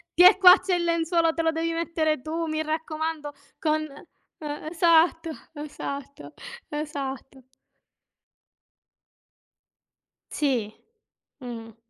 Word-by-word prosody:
"Tiè 365 +3 +8
qua 365 0 +9
c'è 375 -2 -2
il 350 -1 +1
lenzuolo 335 0 +1
te 330 - -1
lo 325 - +2
devi 325 +1 -2
mettere 320 -4 -1
tu, 325 +2 -3
mi 310 0 -2
raccomando." 315 -1 -3 0.3
Con 310 -1 0
eh, 295 +1 -10
esatto, 330 0 +3 0.2
esatto, 285 -2 -7 0.4
esatto. 275 -3 -6 2.9
Sì. 245 -8 -1 0.7
Mh-mh. 230 -3 -8
315 Hz, 95 wpm, -25 LUFS, 290-330 Hz, 2.9 s, qua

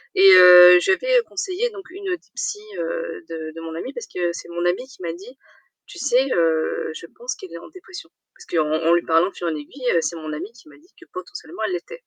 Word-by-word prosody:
et 195 +1 +7
heu, 180 0 +9
je 385 - +2
lui 380 - +3
avais - - +4
conseillé 395 +5 -3
donc 390 -2 -12
une 390 +2 -10
des 360 -2 -2 0.2
psys, 415 - -4 0.2
heu, - - -5
de 160 -1 -7
de 165 - -8
mon 165 0 -7
amie, 255 +11 -6
parce 240 -3 -8
que 175 -1 -2
c'est 170 - -9
mon 175 0 -4
amie 185 +9 -1
qui 255 - -17
m'a 165 - -3
dit: 200 +10 -13 0.5
«Tu 350 - -12
sais, 265 -2 +2
heu, 160 -2 0
je 170 - -10
pense 245 +8 -7
qu'elle 180 -3 -12
est - - -7
en 170 - -12
dépression». 370 +1 -12 0.3
Parce - - -16
qu'en 155 -3 -1 0.2
en - - +5
lui 175 - +2
parlant 165 +3 +2
de - - -19
fil 175 - -5
et - - 0
en - - -3
aiguille, 240 - -3
c'est 170 - -3
mon 155 -1 -7
amie 180 +9 -7
qui 245 +6 -19
m'a - - -17
dit 345 +6 -26
que 350 - -16
potentiellement, 370 0 -9
elle 370 - -2
l'était. 420 +6 -6
195 Hz, 260 wpm, -21 LUFS, -, 0.5 s, heu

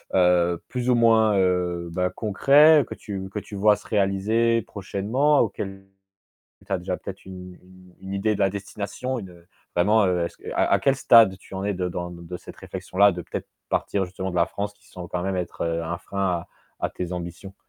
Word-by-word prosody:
heu, 90 -2 +3
plus 125 0 -2
ou 125 - +5
moins, 110 -3 +4
heu, 90 -2 0
bah, 90 +1 0
concret, 145 +8 +5
que - - -5
tu 95 -2 -6
que 100 - -7
tu 105 - -14
vois? 105 +1 +4
Se - - -14
réaliser 110 +3 +2
prochainement, 110 +11 0
auquel 95 -2 -2 0.8
tu 100 - -6
as 95 - +2
déjà 90 +1 -3
peut-être 95 - -9
une 90 -1 -10
une 90 0 -18
une 95 0 -7
idée 105 +2 +1
de - - -5
la 95 -1 +3
destination, 100 +6 -4
une, 95 - -9
heu, 85 -1 -18 0.3
vraiment, 105 +5 +4
heu, 90 -2 +1
est-ce 85 - -6
q - - -8
à - - +2
à - - +5
quel 135 -1 +2
stade 115 -7 +6
tu 95 - -13
en 95 - -3
es 105 - 0
de 90 0 -2
dans 90 0 -4
d 85 -1 -10
de 90 +2 -5
cette - - -12
réflexion-là, 100 +2 +1
de 90 0 -6
peut-être, - - -6 0.2
partir 100 -1 0
justement 95 +1 -5
de - - -4
la 85 0 +4
France, 100 +2 -4
qui - - -25
semble 90 -1 -9
quand 90 0 -3
même 95 0 -1
être, 90 -1 -4
heu, 85 0 -1
un 85 +1 -3
frein 100 +1 -3 0.2
à - - -19 0.3
à - - -1
tes 90 0 -5
ambitions? 90 +2 -7
95 Hz, 220 wpm, -24 LUFS, 90-105 Hz, 0.8 s, stade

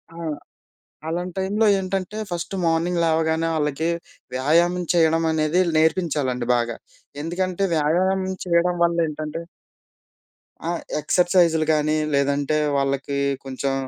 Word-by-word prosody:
ఆ! - - -11 0.9
అలాంటి 175 +2 -3
టైంలో 205 +4 +1
ఏంటంటే 190 +2 -3
ఫస్ట్ 175 +2 -4
మార్నింగ్ 170 +1 +1
లేవగానే 160 0 +1
ఆళ్ళకి 150 +1 -1 0.5
'వ్యాయామం' 170 +6 +2
చేయడం 165 -1 +3
అనేది 155 +3 +1 0.2
నేర్పించాలండి 150 -7 +1
బాగా. 120 -1 -1 0.5
ఎందుకంటే 185 +3 -1
వ్యాయామం 185 +5 +1 0.2
చేయడం 175 0 +2
వల్ల 170 0 +1
ఏంటంటే 155 +1 -5 1.3
ఆ! - - -1 0.3
ఎక్సర్సైజ్‌లు 170 0 +3
గానీ 155 0 +1 0.2
లేదంటే 140 +2 +1 0.2
వాళ్ళకి 140 0 -1 0.3
కొంచెం 135 +1 -2
165 Hz, 105 wpm, -23 LUFS, 150-180 Hz, 1.3 s, చేయడం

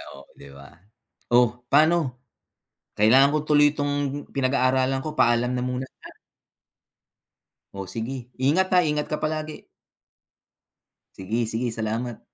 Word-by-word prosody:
O, 70 - -12 0.2
di 70 - -13
ba? 70 0 -14 0.6
Oh, 120 0 +3
pano 155 -3 +3 0.8
kailangan 130 +7 +5
ko 155 - +2
tuloy 145 0 +4
tong 145 -1 -2
pinag-aaralan 130 0 +1
ko 155 +1 -7
paalam 120 +1 +3
na 125 - -2
muna, 125 +1 -3 0.2
ah. - - -11 1.6
O, 95 -1 -6
sige. 120 +5 -6 0.2
Ingat 185 +8 +2
ha, 180 - +6
ingat 150 -2 -1
ka 150 - -4
palagi. 155 0 -4 1.5
Sige, 110 +5 -2
sige 115 +2 -2
salamat. 115 +1 -4
130 Hz, 120 wpm, -24 LUFS, 120-150 Hz, 1.6 s, ha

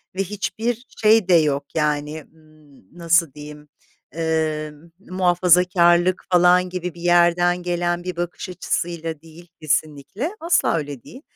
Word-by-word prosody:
ve 195 - 0
hiçbir 220 +5 -4
şey 215 -2 +4
de 180 - +5
yok, 145 -3 +1
yani, 150 0 -2
ımm, 155 - -23
nasıl 170 -3 +2
diyeyim, 150 0 -12 0.5
ııı, 155 -1 -3
muhafazakârlık 180 -1 +2
falan 180 +1 +4
gibi 180 -1 -5
bir 170 - -13
yerden 175 0 +2
gelen 175 0 -2
bir 180 -1 -5
bakış 175 +2 -5
açısıyla 165 -3 -4
değil 165 +2 -16
kesinlikle, 155 - -2
asla 340 - +1
öyle 145 -5 -6
değil. 260 - -13
170 Hz, 125 wpm, -21 LUFS, 155-180 Hz, 0.5 s, de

